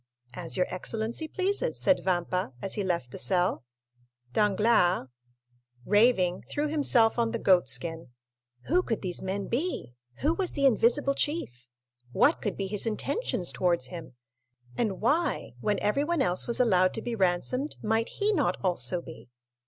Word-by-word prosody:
"As 125 - -5
your 180 - +3
excellency 225 - -3
pleases," 400 +8 0
said 280 - +3
Vampa, 180 -4 -1
as 195 - -2
he 205 - -2
left 170 -10 -2
the - - -7
cell. 180 -5 +1 0.7
Danglars, 205 - +2 0.8
raving, 205 -4 +3
threw 295 +1 -1
himself 260 -7 +3
on 230 -1 +2
the 230 - -2
goat 185 -8 +3
skin. 165 +6 -3 0.5
Who 355 +5 +2
could 225 - -3
these 180 -2 -2
men 195 +1 -3
be? 250 - -3 0.3
Who 310 +3 +2
was 370 +1 -1
the 280 - 0
invisible 270 +3 +3
chief? 130 - -3 0.5
What 305 - +3
could 205 -4 -3
be 195 - -2
his 205 +3 0
intentions 225 - -2
towards 170 -8 0
him? 165 -7 -9 0.6
And 200 - -2
why, 295 - 0
when 205 +5 0
everyone 285 +8 +1
else 180 -6 0
was 235 - 0
allowed 185 -7 +3
to 225 - -4
be 240 - -3
ransomed, 220 - 0
might 225 +1 0
he 425 +1 0
not 300 -9 +1
also 180 -1 0
be? 160 -6 -12
210 Hz, 155 wpm, -28 LUFS, 180-275 Hz, 0.8 s, your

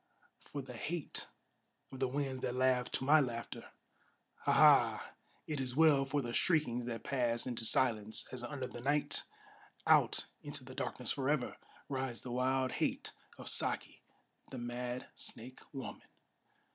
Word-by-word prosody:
for 140 -1 -6
the 125 - -9
hate 155 +6 -3 0.6
of 130 - -8
the 130 - +2
winds 135 -1 -2
that 125 -1 -1
laugh 130 -1 +3
to - - -1
my 150 +4 +7
laughter! 120 -4 -3 0.8
Ha! - - +4
Ha! - - +6 0.3
it 150 -2 -3
is 130 -1 -2
well 150 -3 +6
for 140 +1 0
the 120 -1 -4
shriekings 125 -9 +2
that 115 -1 -4
pass 120 -3 +1
into 120 -3 -3
silence, 110 -4 +1
As 125 -1 -5
under 130 +1 -3
the 120 -1 -7
night, 145 +3 +1 0.6
out - - +4 0.2
into - - -6
the - - -10
darkness - - -3
forever, 135 -1 0 0.3
Rides 130 -3 -3
the 125 - -5
wild 130 +1 +1
hate - - -1 0.3
of - - -9
Saki, - - 0 0.5
the 130 - -6
mad 120 +1 -3
snake 125 +3 -5
woman! 135 -2 -6
130 Hz, 150 wpm, -35 LUFS, 120-140 Hz, 0.8 s, my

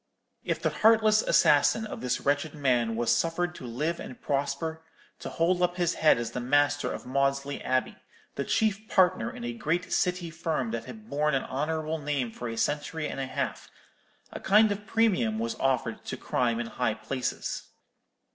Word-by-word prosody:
"If - - -1
the - - 0
heartless 220 -1 +4
assassin 150 +9 +4
of - - -7
this 125 - -1
wretched 145 +2 0
man 125 -6 +1
was 120 +1 +2
suffered 170 +6 0
to 130 - -9
live 150 +9 -2
and 125 - -8
prosper, 145 +3 -2 0.4
to - - -6
hold 175 +2 +1
up 175 0 +2
his 175 -1 +1
head 155 - +4
as 115 -1 -3
the 125 - -4
master 145 +3 +2
of - - -6
Maudesley 140 +1 -1
Abbey, 130 0 0 0.4
the 140 - -2
chief 215 +7 0
partner 185 +3 +3
in 245 0 -9
a 240 0 -3
great 175 -4 -2
City 180 -2 0
firm 170 +6 -2
that - - -4
had 220 -1 -11
borne 150 -2 +1
an 135 - 0
honourable 155 +3 -2
name 140 -5 -2
for 120 +1 -6
a 115 - -5
century 150 +4 -1
and - - -5
a 135 - -2
half, - - -4 0.6
a - - -5
kind 210 +2 +5
of 205 +1 -5
premium 190 - +2
was 115 +1 -2
offered 125 -4 0
to - - -4
crime 120 -2 0
in 120 - -2
high 115 -1 -1
places. 130 +1 -4
150 Hz, 185 wpm, -28 LUFS, 130-180 Hz, 0.6 s, kind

